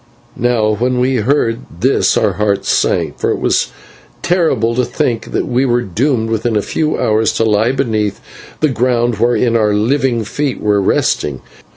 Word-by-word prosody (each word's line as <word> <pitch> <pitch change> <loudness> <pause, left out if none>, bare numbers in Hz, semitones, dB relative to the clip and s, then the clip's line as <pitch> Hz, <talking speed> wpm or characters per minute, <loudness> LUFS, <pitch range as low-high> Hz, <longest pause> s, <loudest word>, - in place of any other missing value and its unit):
Now 115 -3 +1
when 125 +4 0
we 130 +1 +1
heard 115 0 +1 0.2
this - - +2
our - - +1
hearts 100 -1 -1
sank, - - 0
for - - 0
it - - 0
was - - +1 0.6
terrible 160 - +1
to 125 +2 +1
think 120 -2 -2
that - - -1
we 125 +1 0
were 120 -2 +1
doomed 115 - -1
within 115 +1 -1
a 105 - +1
few 155 -1 -1
hours 110 0 +1
to - - 0
lie 110 +2 +2
beneath 110 -6 -1 0.4
the 155 - +3
ground 120 -2 0
whereon 120 0 +2
our 105 -2 +2
living 120 +2 +1
feet 135 +5 -3
were 105 -1 +1
resting. 75 -7 0
115 Hz, 170 wpm, -15 LUFS, 110-125 Hz, 0.6 s, the